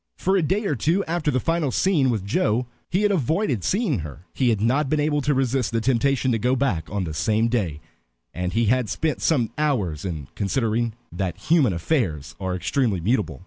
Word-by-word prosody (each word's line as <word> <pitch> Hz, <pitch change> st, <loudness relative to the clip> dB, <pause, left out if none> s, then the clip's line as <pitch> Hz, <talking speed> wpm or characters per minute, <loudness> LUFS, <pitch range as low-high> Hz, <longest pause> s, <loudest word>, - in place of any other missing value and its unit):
For 190 Hz, +1 st, +1 dB
a 190 Hz, -, +3 dB
day 195 Hz, +8 st, 0 dB
or 175 Hz, -, +1 dB
two 165 Hz, -, +1 dB
after 165 Hz, -2 st, -1 dB
the 130 Hz, -, +1 dB
final 165 Hz, 0 st, 0 dB
scene 150 Hz, -3 st, +2 dB
with 110 Hz, -5 st, -1 dB
Joe 110 Hz, +4 st, +1 dB, 0.2 s
he 190 Hz, +4 st, +1 dB
had 210 Hz, -, +3 dB
avoided 155 Hz, -, 0 dB
seeing 195 Hz, -, +1 dB
her. 80 Hz, +2 st, -8 dB
He 130 Hz, -3 st, +2 dB
had 110 Hz, -3 st, +1 dB
not 130 Hz, +6 st, +1 dB
been 155 Hz, -, +1 dB
able 150 Hz, 0 st, +1 dB
to 145 Hz, +1 st, +1 dB
resist 130 Hz, -5 st, 0 dB
the 115 Hz, -, +1 dB
temptation 130 Hz, +2 st, +1 dB
to 115 Hz, -, +1 dB
go 125 Hz, +4 st, +2 dB
back 115 Hz, -, -1 dB
on 100 Hz, -1 st, -2 dB
the 80 Hz, -3 st, -4 dB
same 110 Hz, +8 st, +1 dB
day, 90 Hz, -11 st, -1 dB, 0.5 s
and 90 Hz, 0 st, -2 dB
he 115 Hz, +3 st, +1 dB
had 125 Hz, 0 st, +1 dB
spent 155 Hz, +7 st, -1 dB
some 125 Hz, -9 st, +1 dB
hours 105 Hz, -, 0 dB
in 80 Hz, -8 st, -5 dB
considering 115 Hz, +2 st, 0 dB, 0.2 s
that 90 Hz, 0 st, -3 dB
human 155 Hz, -8 st, +3 dB
affairs 85 Hz, -, -1 dB
are 95 Hz, -2 st, -2 dB
extremely 110 Hz, +1 st, 0 dB
mutable. 105 Hz, +5 st, 0 dB
120 Hz, 205 wpm, -23 LUFS, 100-150 Hz, 0.5 s, a